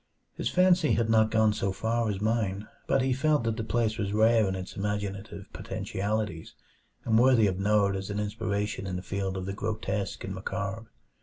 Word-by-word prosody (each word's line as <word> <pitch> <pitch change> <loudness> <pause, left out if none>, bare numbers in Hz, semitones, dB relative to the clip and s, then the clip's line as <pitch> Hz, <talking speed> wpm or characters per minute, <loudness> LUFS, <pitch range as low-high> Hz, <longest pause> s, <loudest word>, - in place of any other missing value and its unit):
His - - -2
fancy 180 -3 +4
had 115 -1 +1
not 110 -1 +4
gone 110 -1 +3
so 100 -2 -1
far 115 +3 -1
as 100 -2 -2
mine, 105 -2 -1 0.2
but 135 - +2
he 130 0 +2
felt 150 0 +2
that 115 -1 0
the 115 - -2
place 110 -1 0
was 100 -1 -1
rare 110 0 +4
in 95 - -2
its 95 0 -7
imaginative 100 0 -4
potentialities, 100 -4 -3 0.5
and 110 -1 +4
worthy 125 -3 +5
of 95 -2 0
note 100 0 +2
as 95 +1 -4
an 100 0 -2
inspiration 105 -2 -2
in 90 - -3
the 90 - -4
field 95 -1 -3
of 95 - -4
the 100 - -3
grotesque 105 -1 -3
and 95 - -4
macabre. 95 +3 -4
105 Hz, 190 wpm, -28 LUFS, 100-115 Hz, 0.5 s, worthy